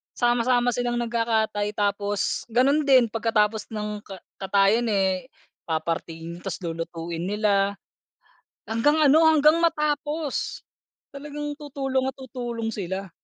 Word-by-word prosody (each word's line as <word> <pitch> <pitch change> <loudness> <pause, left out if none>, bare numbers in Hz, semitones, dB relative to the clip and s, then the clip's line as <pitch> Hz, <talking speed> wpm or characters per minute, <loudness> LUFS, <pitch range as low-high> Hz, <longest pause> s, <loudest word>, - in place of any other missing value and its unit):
sama-sama 245 0 +2
silang 240 0 -1
nagkakatay 225 -3 0
tapos 205 +1 -1
ganun 275 +5 +2
din 250 -5 +5
pagkatapos 220 -2 +1
ng 210 -1 -4
ka 195 - -7 0.2
katayin 200 +4 +3
eh 195 +1 0 0.4
papartihin 165 +1 -3
tas - - -4
lulutuin 165 +1 -4
nila, 200 -1 +1 0.9
hanggang 290 +8 +2
ano, 310 +2 +6
hanggang 305 +1 +5
matapos 300 -1 -1 0.5
talagang 295 +1 -6
tutulong 270 -3 -2
at 265 - -1
tutulong 240 -3 -4
sila. 190 -2 -4
225 Hz, 110 wpm, -25 LUFS, 200-265 Hz, 0.9 s, ano